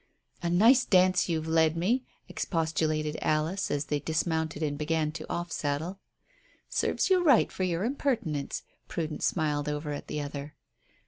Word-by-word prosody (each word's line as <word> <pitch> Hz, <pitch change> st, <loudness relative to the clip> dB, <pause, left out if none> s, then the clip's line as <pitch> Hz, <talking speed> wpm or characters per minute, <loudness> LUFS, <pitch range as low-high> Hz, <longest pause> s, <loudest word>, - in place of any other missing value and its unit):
"A 170 Hz, -, -1 dB
nice 230 Hz, +9 st, +6 dB
dance 185 Hz, -1 st, +4 dB
you've 160 Hz, -2 st, -1 dB
led 160 Hz, 0 st, +3 dB
me," 230 Hz, +10 st, +1 dB, 0.2 s
expostulated 155 Hz, -2 st, -1 dB
Alice, 155 Hz, +5 st, 0 dB
as 145 Hz, 0 st, -1 dB
they 150 Hz, 0 st, -1 dB
dismounted 160 Hz, 0 st, -1 dB
and 145 Hz, -1 st, -1 dB
began 155 Hz, +1 st, 0 dB
to 155 Hz, 0 st, -7 dB
off 175 Hz, 0 st, -3 dB
saddle. 160 Hz, +7 st, -2 dB, 0.7 s
"Serves -, -, 0 dB
you 365 Hz, -1 st, +5 dB
right 275 Hz, -9 st, +5 dB
for -, -, -6 dB
your 180 Hz, -1 st, 0 dB
impertinence," 225 Hz, -, -1 dB, 0.2 s
Prudence 155 Hz, -2 st, -3 dB
smiled 150 Hz, -3 st, 0 dB
over 150 Hz, 0 st, -3 dB
at 145 Hz, -, -5 dB
the 150 Hz, -, -3 dB
other. 145 Hz, 0 st, -6 dB
160 Hz, 150 wpm, -29 LUFS, 150-180 Hz, 0.7 s, nice